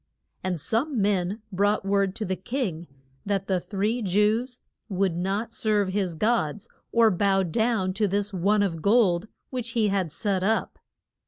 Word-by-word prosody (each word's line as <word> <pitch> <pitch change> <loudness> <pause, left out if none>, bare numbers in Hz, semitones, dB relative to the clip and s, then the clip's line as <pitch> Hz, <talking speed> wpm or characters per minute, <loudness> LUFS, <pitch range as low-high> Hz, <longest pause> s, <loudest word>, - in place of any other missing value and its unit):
And 185 -3 -1
some 235 - -1
men 200 +1 0
brought 205 +1 +1
word 195 -1 +1
to 215 - -3
the 190 - -1
king 185 - -3 0.4
that 195 -1 -1
the 190 -2 +1
three 210 +6 -1
Jews 215 +6 +1 0.3
would 190 -3 0
not 195 +6 -2
serve 210 -4 +1
his 185 -3 -1
gods, 210 0 0 0.2
or 230 -2 +5
bow 195 +1 +2
down 190 +1 0
to 210 +2 +1
this 205 +1 -1
one 200 +3 +2
of 165 -5 -2
gold 200 -3 +3 0.2
which 245 -3 -4
he 215 -2 +3
had 190 -5 0
set 195 +3 -1
up. 220 +4 0
200 Hz, 160 wpm, -26 LUFS, 185-220 Hz, 0.4 s, or